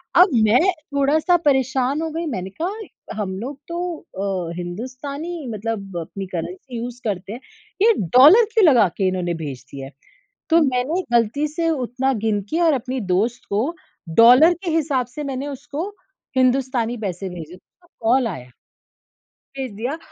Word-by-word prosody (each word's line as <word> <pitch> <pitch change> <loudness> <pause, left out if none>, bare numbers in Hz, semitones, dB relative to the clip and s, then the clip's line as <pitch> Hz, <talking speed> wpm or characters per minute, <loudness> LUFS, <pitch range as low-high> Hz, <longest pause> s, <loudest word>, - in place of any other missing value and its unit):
अब 365 +3 +7 0.2
मैं 220 +4 +5 0.3
थोड़ा-सा 300 +5 +3
परेशान 265 +1 +2
हो 325 - -2
गयी 330 +2 -3
मैंने 190 -4 -4
कहा 400 - -6
हम 190 -2 -3
लोग 265 +6 -6
तो 340 - -5 0.7
अ, - - -5
हिंदुस्तानी 260 - -6
मतलब 200 -4 -4
अपनी 195 +4 -7
करेंसी 255 - -5
यूज़ 240 +1 -6
करते 200 0 -3
हैं, 240 - -7 0.4
ये 455 +2 +6 0.2
डॉलर 335 - +9
क्यों 440 -5 +5
लगा 245 -9 +6
के 195 - +1
इन्होने 180 -2 -1
भेज 135 -3 -7
दिया 135 -1 -7
है? - - -13 0.6
तो 330 +1 +6
मैंने 275 +6 0
गलती 235 +6 +2
से 330 +2 -1
उतना 265 -2 -1
गिन 210 -2 +1
के 330 - 0
और 325 -2 +4
अपनी 260 0 -3
दोस्त 230 +6 0
को 230 +12 0 0.5
डॉलर 250 +9 +8
के 345 - -1
हिसाब 290 -6 +1
से 295 +5 -7
मैंने 270 0 -4
उसको 290 +5 -5 0.5
हिंदुस्तानी 255 -2 +1
पैसे 195 -2 -4
भेजे, 175 -1 -9
तो 345 - -28
कॉल 240 +2 +3
आया 130 - -8 1.1
भेज 265 -3 -4
दिया, 250 +9 -3
255 Hz, 160 wpm, -21 LUFS, 210-300 Hz, 1.1 s, डॉलर